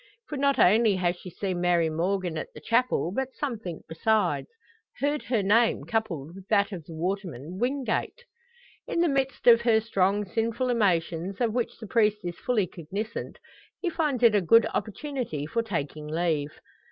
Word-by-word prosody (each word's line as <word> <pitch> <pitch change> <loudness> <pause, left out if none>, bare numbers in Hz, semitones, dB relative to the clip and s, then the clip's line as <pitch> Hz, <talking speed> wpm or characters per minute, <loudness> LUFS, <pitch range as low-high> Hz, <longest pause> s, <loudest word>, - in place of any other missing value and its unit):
For 300 - -4
not 280 0 +2
only 215 +2 +5
has 180 -1 0
she 180 - -9
seen 185 0 -3
Mary 175 -2 +3
Morgan 175 +2 -1
at 155 - -5
the - - -8
chapel, 230 0 +1
but 265 0 -2
something 225 - -4
besides 215 +7 +1 0.5
heard 290 +1 0
her 235 -5 +1
name 225 +4 +3
coupled 175 -10 -2
with 195 0 -12
that 205 -1 +2
of 175 -6 -7
the 165 - -10
waterman, 180 -2 -4
Wingate. 265 - -1 0.6
In 335 - 0
the 345 - +4
midst 270 -2 -1
of 235 -1 +8
her 230 -2 +4
strong, 205 -2 +1
sinful 230 +5 -1
emotions, 180 -4 0
of 235 -3 +1
which 245 -1 -2
the 225 - -9
priest 215 -1 +2
is 175 -1 -5
fully 230 -6 +1
cognisant, 195 +7 -6 0.4
he 355 - -1
finds 295 -7 -1
it 230 -2 +7
a 205 - +3
good 230 +6 +5
opportunity 230 - -3
for 230 +10 -1
taking 155 -8 -4
leave. 155 -2 0
210 Hz, 170 wpm, -27 LUFS, 175-235 Hz, 0.6 s, of